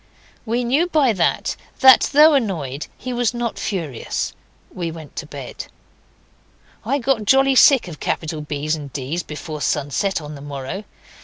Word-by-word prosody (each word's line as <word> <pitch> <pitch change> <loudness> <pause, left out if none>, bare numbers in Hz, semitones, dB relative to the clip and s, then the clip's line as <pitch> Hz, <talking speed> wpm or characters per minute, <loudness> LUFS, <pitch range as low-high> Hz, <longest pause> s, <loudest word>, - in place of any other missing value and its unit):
We 235 +3 0
knew 275 +9 +2
by 290 -8 +3
that 175 -4 0 0.3
that, 260 -2 +7
though 300 +2 +7
annoyed, 160 - -1
he 255 0 -5
was 245 -1 0
not 240 -1 -3
furious; 165 - -3 0.4
we 175 -2 -3
went 160 -3 -10
to 160 - -5
bed. 140 -4 -8 1.2
I 265 +6 0
got 250 -4 0
jolly 270 +4 +4
sick 265 -3 +6
of 160 -4 -9
capital 160 -1 -3
B's 150 +1 -2
and 145 -3 -8
D's 145 +5 -3
before 150 -1 -7
sunset 150 +8 0
on 150 -1 -8
the 140 - -10
morrow. 145 +7 -6
175 Hz, 155 wpm, -21 LUFS, 150-245 Hz, 1.2 s, that